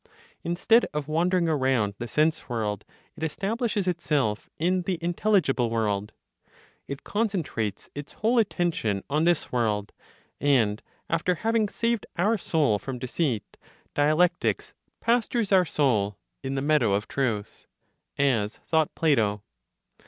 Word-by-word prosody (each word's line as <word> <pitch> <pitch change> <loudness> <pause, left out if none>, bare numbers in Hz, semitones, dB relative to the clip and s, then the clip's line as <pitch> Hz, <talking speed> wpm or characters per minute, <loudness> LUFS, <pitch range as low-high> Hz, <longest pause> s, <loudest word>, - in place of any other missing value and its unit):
Instead 200 +7 +3
of 150 -1 -2
wandering 170 +3 +2
around 130 -9 +1
the 120 - -4
sense 155 +7 +1
world, 110 -4 -2 0.3
it - - -13
establishes 205 - -1
itself 150 -11 0
in 180 +3 +1
the 180 0 -2
intelligible 170 - +1
world; 105 -2 -1 0.8
it 140 0 -6
concentrates 170 - -2
its 145 +1 -8
whole 230 +3 +2
attention 170 - 0
on 155 +3 +2
this 175 -2 +1
world, 105 -4 0 0.5
and 115 -7 +2 0.3
after 170 +2 +1
having 225 +2 +1
saved 230 0 -1
our 205 +6 +3
soul 150 - +1
from 130 +5 -5
deceit, 125 -2 -2 0.4
dialectics 155 +4 +2 0.3
"pastures 235 -2 +1
our 185 -2 +5
soul 110 - +1 0.2
in 135 0 -3
the 135 - -1
meadow 145 -9 +3
of 105 +1 -2
truth," 115 -7 -2 0.5
(as 120 -7 +1
thought 160 -2 0
Plato). 110 -10 +2
150 Hz, 125 wpm, -26 LUFS, 115-180 Hz, 0.8 s, our